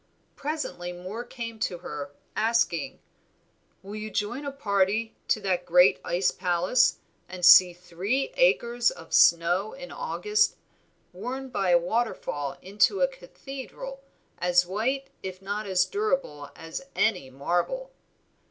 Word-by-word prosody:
Presently 285 - -4
Moor 185 +6 -6
came 230 -2 -7
to 180 - -2
her 150 -4 -6 0.3
asking 230 +1 +1 0.9
"Will 200 +2 -8
you 215 0 -5
join 215 +7 -3
a 280 - -3
party 215 -3 0
to - - +2
the 190 -3 0
great 180 +2 +5
ice 180 +1 +1
palace, 180 +5 +2 0.3
and 180 -1 -2
see 180 +1 +9
three 180 - -2
acres 240 - +3
of 165 - -11
snow 175 +5 +4
in 270 0 -9
August, 435 -3 0 0.6
worn 255 +8 -5
by 195 -6 -1
a 175 - +7
waterfall 175 - -2
into 205 - +2
a - - +5
cathedral, - - -9 0.4
as 180 0 +3
white 250 +9 -2
if 185 -1 -6
not 205 +2 -4
as 190 0 +3
durable 270 - -2
as 165 +7 -7
any 185 -12 +1
marble?" 175 - -2
205 Hz, 130 wpm, -27 LUFS, 180-265 Hz, 0.9 s, see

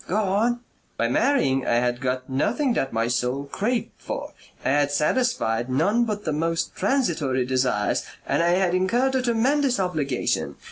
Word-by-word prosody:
"Go 190 - 0
on." 215 +4 +1 0.4
"By 115 - +1
marrying 135 - +2
I - - +2
had 120 +1 0
got 130 0 -2
nothing 240 - 0
that 135 -11 -1
my 115 0 0
soul 125 +3 -1
craved 220 - -2
for, - - -6 0.3
I - - +2
had 145 +1 +2
satisfied 145 - 0
none 200 - +2
but 210 -2 -4
the 155 - 0
most 165 +2 -1
transitory 155 - 0
desires 125 -5 0 0.2
and - - +1
I 170 - +3
had 180 -1 +2
incurred 235 +9 +1
a 260 - +2
tremendous 250 +2 +1
obligation. 155 -9 -1
165 Hz, 160 wpm, -24 LUFS, -, 0.4 s, I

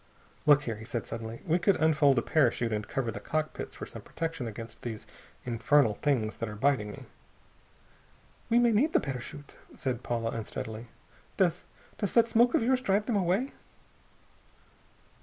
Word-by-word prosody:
"Look 145 -1 +7
here," 115 -5 -3
he 110 - -9
said 115 0 -3
suddenly, 115 0 -6
"we 170 +3 +2
could 195 +2 +3
unfold 150 -4 +4
a 120 - +2
parachute 120 -6 +2
and 105 -1 -2
cover 125 -4 -2
the 100 - -6
cockpits 155 +8 -3
for - - -6
some - - -9
protection 165 -6 -4
against 115 +1 -8
these 110 -3 -6 0.4
infernal 120 +1 +3
things 115 -3 0
that 115 - -3
are 105 - -7
biting 110 -3 +1
me." - - -10 1.4
"We 235 - +4
may 240 -1 +5
need 270 +9 +2
the - - +5
parachute," 140 +1 -7 0.2
said 125 -3 -2
Paula 115 -2 -2
unsteadily. 110 +1 -5 0.5
"Does 180 -2 +1 0.3
does 205 - -1
that 230 -1 +5
smoke 235 +1 +4
of - - +3
yours 255 +2 +2
drive 205 -2 +1
them 235 - 0
away?" 195 +8 +1
135 Hz, 165 wpm, -29 LUFS, 115-180 Hz, 1.4 s, Look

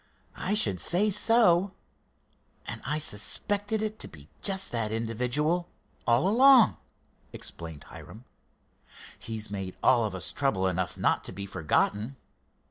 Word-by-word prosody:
"I 195 +3 -1
should 100 - +2
say 205 +5 +2
so, 200 -3 +3 0.9
and - - -6
I 150 +4 -1
suspected 205 - -2
it 215 0 -4
to - - -6
be 75 -1 -15
just 195 -1 0
that 115 -3 -1
individual 125 +10 -1 0.4
all 120 +9 +3
along," 245 - +6 0.6
explained 80 -4 -7
Hiram. 110 +7 -12 0.9
"He's 110 -2 -6
made 95 -2 -5
all 125 -3 +4
of 105 -3 -3
us 90 -4 -2
trouble 135 -10 0
enough 95 -1 -1
not - - +1
to - - -4
be 100 - -6
forgotten." 105 - -1
120 Hz, 130 wpm, -28 LUFS, -, 0.9 s, along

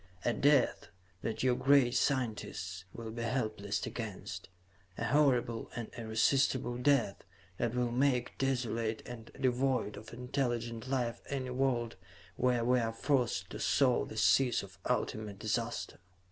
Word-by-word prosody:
A 120 - +3
death 140 -2 +3 0.3
that 115 - -3
your 125 -1 +4
great 135 -2 +4
scientists 105 -10 -1
will 115 +2 -7
be 115 +1 -5
helpless 110 -4 -1
against; 95 -5 -6 0.5
a 115 - -2
horrible 125 -3 +2
and 115 -2 -5
irresistable 120 +2 +1
death 125 -7 +2 0.4
that 120 0 0
will 125 -1 +1
make 125 0 +1
desolate 115 -4 -1
and 120 -2 -9
devoid 130 -3 +1
of 110 +2 -10
intelligent 120 -2 -2
life 125 -3 -1
any 130 -2 -2
world 125 -3 0 0.4
where 125 0 +2
we 125 +1 +4
are 115 -1 0
forced 120 -7 0
to - - -6
sow 130 -3 +3
the 110 - -8
seeds 125 0 +4
of 95 -3 -13
ultimate 105 -2 -1
disaster. 115 +3 -2
120 Hz, 135 wpm, -33 LUFS, 110-130 Hz, 0.5 s, your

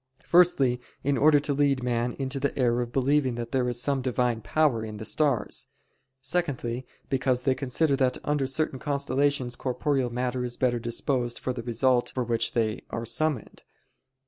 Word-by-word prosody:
Firstly, 140 -8 +4 0.2
in 140 +1 +1
order 145 +3 +5
to 145 0 0
lead 140 -2 +2
man 120 0 0
into 135 0 -3
the 140 +1 -2
error 120 -2 +2
of 120 -1 -4
believing 135 -1 +2
that 120 0 -5
there 125 -2 +1
is 120 -1 -2
some 135 +2 0
Divine 125 -2 0
power 140 -4 +1
in 110 -1 -6
the 110 - -6
stars. 140 -1 0 0.6
Secondly, 130 -6 -2 0.2
because 130 -1 0
they 130 - +3
consider 135 +3 +1
that 130 -2 +1
under 145 -2 0
certain 135 0 -1
constellations 140 -2 0
corporeal 130 0 -1
matter 125 +1 -2
is 120 -1 -4
better 120 -2 +1
disposed 120 +1 -2
for 130 - -3
the 120 - -5
result 120 +1 +1
for 130 - 0
which 115 -1 0
they 110 -2 0
are 115 0 -4
summoned. 150 0 -2
130 Hz, 170 wpm, -27 LUFS, 120-140 Hz, 0.6 s, order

